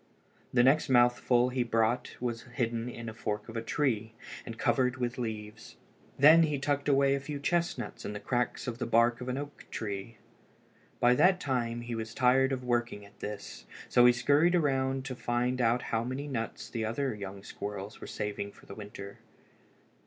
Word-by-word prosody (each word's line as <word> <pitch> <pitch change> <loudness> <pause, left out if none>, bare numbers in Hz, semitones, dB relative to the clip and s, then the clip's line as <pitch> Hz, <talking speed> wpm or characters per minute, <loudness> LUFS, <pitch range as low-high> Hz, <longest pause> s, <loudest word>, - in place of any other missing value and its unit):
The 120 -1 +4
next 140 +3 +4
mouthful 120 0 +4
he 125 0 -1
brought 115 +1 0
was 120 -2 -3
hidden 115 -2 -1
in 115 -1 -7
a 110 - -5
fork 105 -2 -4
of 115 - -9
a 115 - -1
tree 115 -3 -1 0.3
and 115 - -6
covered 130 0 +1
with 120 0 -2
leaves. 110 -2 -6 0.4
Then 155 +4 +8
he 150 -3 +2
tucked 145 +1 -1
away 140 0 +4
a 140 - 0
few 140 +1 -5
chestnuts 170 +4 -1
in 105 - -4
the 105 - -5
cracks 125 +2 -1
of 120 -2 -4
the 120 - -2
bark 115 +1 +3
on 125 - -4
an 125 - -2
oak 145 0 -7
tree. 105 +1 -5 0.8
By 120 0 +5
that 185 +8 +4
time 120 -6 -1
he 120 0 -5
was 115 0 -5
tired 135 +1 +4
of 130 -1 -2
working 120 -4 -1
at 100 - -19
this, 105 0 -7 0.2
so 120 0 +6
he - - +8
scurried 145 +8 +3
around 135 -4 +1
to 130 -2 -4
find 125 +1 -1
out 120 +1 +2
how 115 0 +2
many 130 +4 -4
nuts 115 -5 -4
the 115 -2 -2
other 125 +4 -1
young 100 -1 -7
squirrels 100 0 -7
were - - -7
saving 100 -1 -4
for - - -18
the - - -9
winter. 100 -1 -9
120 Hz, 190 wpm, -30 LUFS, 115-135 Hz, 0.8 s, Then